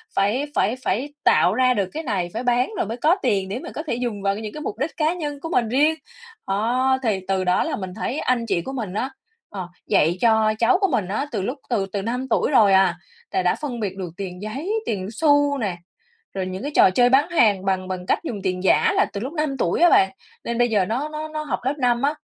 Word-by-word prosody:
phải 210 Hz, +8 st, +1 dB
phải 220 Hz, +5 st, +2 dB
phải 265 Hz, +9 st, -1 dB
tạo 180 Hz, -, +4 dB
ra 255 Hz, +2 st, +3 dB
được 200 Hz, -5 st, -1 dB
cái 320 Hz, -, -4 dB
này, 195 Hz, -, -2 dB
phải 230 Hz, -, -3 dB
bán 245 Hz, 0 st, +2 dB
rồi -, -, 0 dB
mới 225 Hz, +3 st, -5 dB
có 315 Hz, +8 st, +3 dB
tiền, 195 Hz, -2 st, 0 dB
để 215 Hz, +6 st, -3 dB
mà -, -, -8 dB
có 305 Hz, -, -4 dB
thể 235 Hz, -, 0 dB
dùng 235 Hz, -4 st, -3 dB
vào 195 Hz, 0 st, +1 dB
cái 215 Hz, -, -6 dB
những 215 Hz, -1 st, -6 dB
cái 305 Hz, -, -7 dB
mục 215 Hz, -, -4 dB
đích 295 Hz, +4 st, -3 dB
cá 315 Hz, +1 st, +2 dB
nhân 295 Hz, -5 st, -5 dB
của 325 Hz, -, -6 dB
mình 240 Hz, -8 st, +1 dB
riêng. 295 Hz, +6 st, +3 dB, 0.5 s
Đó, 245 Hz, +7 st, +1 dB
thì 215 Hz, -5 st, +1 dB
từ 190 Hz, -1 st, 0 dB
đó 180 Hz, 0 st, +2 dB
là 320 Hz, -, -2 dB
mình 190 Hz, -5 st, -6 dB
thấy 270 Hz, -, -3 dB
anh 245 Hz, -2 st, 0 dB
chị 190 Hz, -6 st, 0 dB
của 265 Hz, -, -6 dB
mình 220 Hz, -8 st, -4 dB
á, 250 Hz, +6 st, -2 dB, 0.4 s
ờ, 190 Hz, -3 st, -6 dB, 0.2 s
dạy 165 Hz, +4 st, +3 dB
cho 220 Hz, -2 st, +4 dB
cháu 235 Hz, +6 st, +4 dB
của 390 Hz, -, +4 dB
mình 215 Hz, -8 st, 0 dB
á 210 Hz, +9 st, -2 dB
từ -, -, -2 dB
lúc 250 Hz, +9 st, -3 dB
từ 215 Hz, -6 st, +1 dB
từ 200 Hz, -, -1 dB
5 245 Hz, +5 st, -3 dB
tuổi 250 Hz, -, +1 dB
rồi 215 Hz, -7 st, +5 dB
à, 190 Hz, -2 st, +4 dB, 0.4 s
là -, -, +1 dB
đã 180 Hz, -, +2 dB
phân 270 Hz, -6 st, -5 dB
biệt 200 Hz, -4 st, -3 dB
được 185 Hz, -3 st, -4 dB
tiền 185 Hz, -2 st, -6 dB
giấy, 275 Hz, -, -4 dB
tiền 190 Hz, -3 st, -2 dB
xu 290 Hz, +2 st, +3 dB
nè, 200 Hz, -8 st, -2 dB, 0.6 s
rồi 190 Hz, -1 st, -2 dB
những 185 Hz, +1 st, -5 dB
cái 290 Hz, -, -3 dB
trò -, -, +7 dB
chơi 245 Hz, +6 st, +3 dB
bán 270 Hz, +5 st, +4 dB
hàng 210 Hz, -, +3 dB
bằng 190 Hz, -1 st, 0 dB
bằng 185 Hz, -1 st, -5 dB
cách -, -, +1 dB
dùng 230 Hz, -11 st, -5 dB
tiền 185 Hz, -1 st, -2 dB
giả 445 Hz, -, +4 dB
là 395 Hz, -, +4 dB
từ 200 Hz, -, -4 dB
lúc 265 Hz, +6 st, -5 dB
5 305 Hz, -4 st, -1 dB
tuổi 175 Hz, -, 0 dB
á 350 Hz, -, +7 dB
bạn. 190 Hz, -9 st, +4 dB, 0.3 s
Nên 235 Hz, -, -3 dB
bây 240 Hz, 0 st, +3 dB
giờ 205 Hz, -4 st, +2 dB
nó 255 Hz, +10 st, -2 dB
nó 305 Hz, 0 st, -5 dB
nó 310 Hz, 0 st, -5 dB
học 300 Hz, -, -2 dB
lớp 265 Hz, +3 st, 0 dB
5 240 Hz, -2 st, +2 dB
á 285 Hz, +2 st, +2 dB
230 Hz, 260 wpm, -22 LUFS, 195-275 Hz, 0.6 s, trò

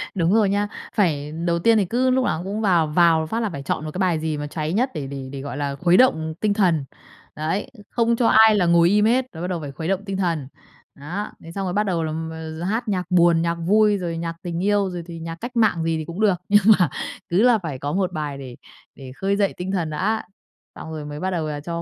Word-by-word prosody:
Đúng 175 Hz, +1 st, +2 dB
rồi 215 Hz, -3 st, +4 dB
nha. 205 Hz, +1 st, +1 dB, 0.3 s
Phải 150 Hz, -8 st, +1 dB
đầu 170 Hz, -1 st, +1 dB
tiên 225 Hz, +5 st, +4 dB
thì 200 Hz, -, +2 dB
cứ 250 Hz, +7 st, +1 dB
lúc 255 Hz, 0 st, +2 dB
nào 165 Hz, -, -1 dB
cũng 200 Hz, +3 st, -3 dB
vào 175 Hz, -7 st, +3 dB
vào 160 Hz, 0 st, +3 dB
phát 225 Hz, +8 st, -2 dB
là 220 Hz, -3 st, -1 dB
phải 140 Hz, -5 st, -7 dB
chọn 150 Hz, -, -2 dB
một 155 Hz, -, -5 dB
cái 185 Hz, -, -5 dB
bài 175 Hz, -4 st, +1 dB
gì 155 Hz, -1 st, -2 dB
mà 145 Hz, 0 st, -4 dB
cháy 155 Hz, +1 st, -3 dB
nhất 250 Hz, +6 st, +1 dB
để 150 Hz, -5 st, -4 dB
để 135 Hz, -1 st, -7 dB
để, 140 Hz, -, -6 dB
gọi 140 Hz, +1 st, -6 dB
là, 140 Hz, -1 st, -2 dB
khuấy 175 Hz, +4 st, +3 dB
động, 255 Hz, 0 st, +6 dB
ừm, 160 Hz, 0 st, -5 dB
tinh 205 Hz, +3 st, 0 dB
thần. 175 Hz, -9 st, +2 dB, 0.5 s
Đấy, 175 Hz, +11 st, -2 dB, 0.2 s
không 235 Hz, -1 st, +1 dB
cho 235 Hz, -1 st, +2 dB
ai 220 Hz, -1 st, +6 dB
là 185 Hz, -4 st, +2 dB
ngồi 170 Hz, 0 st, +5 dB
im 210 Hz, +2 st, +3 dB
hết, 245 Hz, +3 st, +3 dB
rồi 160 Hz, -, -8 dB
bắt 180 Hz, -, -2 dB
đầu 180 Hz, -2 st, -2 dB
phải 145 Hz, -2 st, -6 dB
khuấy 160 Hz, +4 st, -6 dB
động 195 Hz, +1 st, -1 dB
tinh 195 Hz, -1 st, -3 dB
thần. 165 Hz, -8 st, -1 dB, 0.5 s
Đó. 175 Hz, +9 st, -5 dB
Thế 165 Hz, -, -10 dB
xong 195 Hz, +1 st, -3 dB
rồi 180 Hz, -, -2 dB
bắt 210 Hz, +2 st, +2 dB
đầu 175 Hz, -4 st, -1 dB
là 155 Hz, -, -2 dB
m 160 Hz, +1 st, -4 dB, 0.3 s
d 170 Hz, -, -5 dB
hát 230 Hz, +3 st, -2 dB
nhạc 185 Hz, -3 st, -1 dB
buồn, 170 Hz, -2 st, +4 dB
nhạc 170 Hz, 0 st, 0 dB
vui, 205 Hz, +5 st, +3 dB
rồi 170 Hz, -3 st, -4 dB
nhạc 165 Hz, 0 st, -4 dB
tình 175 Hz, +1 st, -3 dB
yêu, 205 Hz, -1 st, +2 dB
rồi 175 Hz, -2 st, -6 dB
thì 165 Hz, -1 st, -8 dB
nhạc 165 Hz, 0 st, -6 dB
cách 240 Hz, +7 st, -8 dB
mạng 220 Hz, -8 st, +2 dB
gì 165 Hz, -1 st, 0 dB
thì 155 Hz, -, -4 dB
cũng 170 Hz, +4 st, -7 dB
được. 205 Hz, -4 st, +4 dB
Nhưng 205 Hz, -1 st, +5 dB, 0.2 s
mà 175 Hz, -4 st, +3 dB, 0.4 s
cứ 180 Hz, +5 st, +2 dB
là 245 Hz, -1 st, +5 dB
phải 160 Hz, -9 st, -6 dB
có 145 Hz, +2 st, -3 dB
một 185 Hz, -1 st, 0 dB
bài 150 Hz, -3 st, -4 dB
để 130 Hz, -3 st, -9 dB, 0.4 s
để 135 Hz, -2 st, -10 dB
khơi 195 Hz, +6 st, 0 dB
dậy 200 Hz, -1 st, +1 dB
tinh 180 Hz, +1 st, -4 dB
thần 175 Hz, -5 st, -1 dB
đã, 205 Hz, +8 st, -1 dB, 0.5 s
xong 160 Hz, -, -8 dB
rồi 155 Hz, -2 st, -6 dB
mới 150 Hz, 0 st, -7 dB
bắt 190 Hz, +3 st, -2 dB
đầu 165 Hz, -3 st, -2 dB
là 150 Hz, -1 st, -4 dB
cho 170 Hz, +2 st, -5 dB
175 Hz, 270 wpm, -22 LUFS, 160-205 Hz, 0.5 s, động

